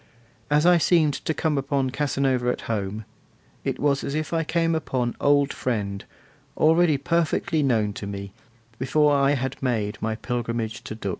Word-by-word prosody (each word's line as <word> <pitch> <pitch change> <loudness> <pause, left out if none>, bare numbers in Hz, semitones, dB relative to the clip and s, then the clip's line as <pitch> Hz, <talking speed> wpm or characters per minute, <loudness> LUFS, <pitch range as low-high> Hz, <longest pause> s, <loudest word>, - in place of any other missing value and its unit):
As 150 +2 +3
I 175 -1 +6
seemed 160 -3 +3
to 160 - -3
come 155 -2 0
upon 135 -1 -1
Casanova 135 -3 0
at - - -2
home, 105 -1 -3 0.6
it - - -2
was 140 -1 +1
as 140 - -3
if 155 +2 -3
I 165 0 +1
came 165 +1 +1
upon 130 -6 -1
old 145 0 +3
friend, 100 -5 -3 0.5
already 160 -1 +4
perfectly 165 +1 0
known 110 -7 +1
to 100 - -6
me, 100 -1 -6 0.5
before 145 +3 +3
I 140 0 +3
had 130 0 -4
made 110 -6 -1
my 110 0 -1
pilgrimage 115 -1 -3
to 110 - -6
Dux. 100 -3 -4
135 Hz, 165 wpm, -24 LUFS, 115-150 Hz, 0.6 s, I